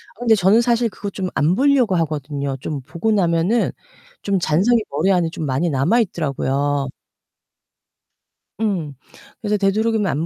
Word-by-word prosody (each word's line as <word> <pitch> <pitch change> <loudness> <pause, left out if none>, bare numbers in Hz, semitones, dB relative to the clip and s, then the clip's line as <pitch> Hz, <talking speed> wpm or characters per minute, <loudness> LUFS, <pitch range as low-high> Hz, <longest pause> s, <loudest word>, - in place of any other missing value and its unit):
어 - - -25
근데 230 -2 +4
저는 200 +4 +4
사실 235 -1 +1
그거 200 0 -6
좀 185 -2 -4
안 150 +5 +2
보려고 260 -7 +3
하거든요. 145 -4 -2
좀 145 -1 -5
보고 175 - -2
나면은 180 +3 +1 0.5
좀 200 -2 0
잔상이 190 +10 +2
머리 155 +8 +1
안에 175 -3 +2
좀 160 - -5
많이 140 +6 0
남아있더라요. 145 - 0 1.7
음. 180 -10 -1 0.5
그래서 210 -1 0
되도록이면 210 +1 +1
안 155 0 -1
180 Hz, 300 characters per minute, -20 LUFS, 150-215 Hz, 1.7 s, 근데